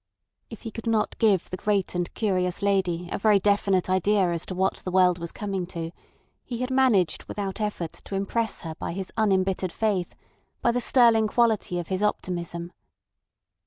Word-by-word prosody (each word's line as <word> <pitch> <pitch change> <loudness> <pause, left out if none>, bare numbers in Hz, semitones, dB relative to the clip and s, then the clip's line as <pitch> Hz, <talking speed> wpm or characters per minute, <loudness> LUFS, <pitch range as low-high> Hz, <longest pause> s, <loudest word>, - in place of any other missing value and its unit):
If 225 - -10
he 225 - -5
could 225 +2 -7
not 225 -2 +1
give 205 -6 +3
the 185 - -3
great 200 -1 0
and 175 0 -2
curious 185 -3 0
lady 185 -4 +1
a - - -2
very 210 0 +5
definite 200 -2 +2
idea 185 0 +2
as 170 -1 -3
to 185 - -4
what 190 +1 +1
the - - -6
world 180 -1 +4
was 170 0 -6
coming 195 -4 -3
to, 165 -2 -5 0.5
he 240 - -5
had 255 +1 -2
managed 255 -10 +2
without 200 +1 -4
effort 205 -6 -2
to 195 - -5
impress 220 +3 -1
her 160 -2 -5
by 160 - -5
his 190 +1 -6
unembittered 190 -4 +1
faith, 195 -3 -1 0.4
by 235 - +2
the 245 +1 -1
sterling 230 -4 +5
quality 220 -5 +1
of 175 -2 -4
his 190 0 -1
optimism. 175 -4 -2
195 Hz, 180 wpm, -26 LUFS, 180-215 Hz, 0.5 s, very